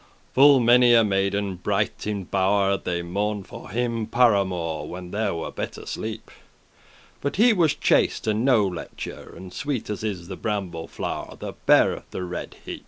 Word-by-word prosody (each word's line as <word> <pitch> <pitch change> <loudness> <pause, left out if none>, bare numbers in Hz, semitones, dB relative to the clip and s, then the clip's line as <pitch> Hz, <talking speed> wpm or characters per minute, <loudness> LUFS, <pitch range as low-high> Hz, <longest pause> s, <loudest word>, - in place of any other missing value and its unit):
Full 140 0 +7
many 120 0 +6
a 115 - +6
maiden 100 -1 0
bright 90 - -1
in 105 -2 -2
bow'r 100 +1 +2
They 85 -1 -2
mourned 100 +3 -2
for - - -10
him 115 0 -1
par 120 -1 +4
amour, 90 -5 -2
When 90 0 -8
them 105 -3 -1
were 80 - -5
better - - -6
sleep; 110 0 -6 0.9
But 140 - -2
he 225 +4 +5
was 170 -7 +2
chaste, - - +2
and 110 +1 0
no 125 -6 +4
lechour, 90 -3 -7
And 95 -1 -10
sweet 125 +1 -3
as 105 - -5
is 95 -6 -4
the 95 - -6
bramble 90 -6 -3
flow'r - - -5
That - - -8
beareth - - +4
the 90 - -5
red 90 -1 -6
heep. - - -6
100 Hz, 170 wpm, -24 LUFS, 95-115 Hz, 0.9 s, Full